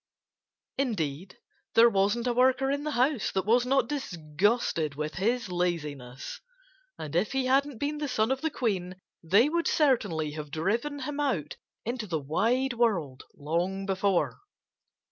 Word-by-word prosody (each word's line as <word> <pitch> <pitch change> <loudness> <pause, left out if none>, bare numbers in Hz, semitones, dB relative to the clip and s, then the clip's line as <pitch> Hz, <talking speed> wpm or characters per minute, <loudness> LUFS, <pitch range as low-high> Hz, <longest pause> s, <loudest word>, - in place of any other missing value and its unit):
Indeed, 185 - -2 0.4
there 230 +1 +8
wasn't 205 +2 +1
a 245 - +1
worker 260 +2 +3
in 285 +1 -2
the - - -1
house 255 -2 +2
that 190 -1 0
was 240 +3 +3
not 265 -2 +3
disgusted 175 - -1
with 150 +1 -3
his 230 +3 0
laziness. 150 -8 -3 0.6
And 155 +1 -6
if 190 +9 +1
he 265 -1 0
hadn't 270 0 +2
been 295 +4 -2
the 295 - -2
son 220 -2 +1
of 265 - -1
the 320 - 0
Queen 190 - -2 0.3
they 200 - +4
would 335 +2 0
certainly 175 - +2
have 150 -1 -7
driven 230 - -1
him 290 +2 -4
out 205 - -1 0.3
into 235 -1 -3
the 165 -3 -1
wide 230 - +1
world 185 - 0
long 175 +6 -2
before. 195 -1 0
215 Hz, 150 wpm, -28 LUFS, 170-260 Hz, 0.6 s, there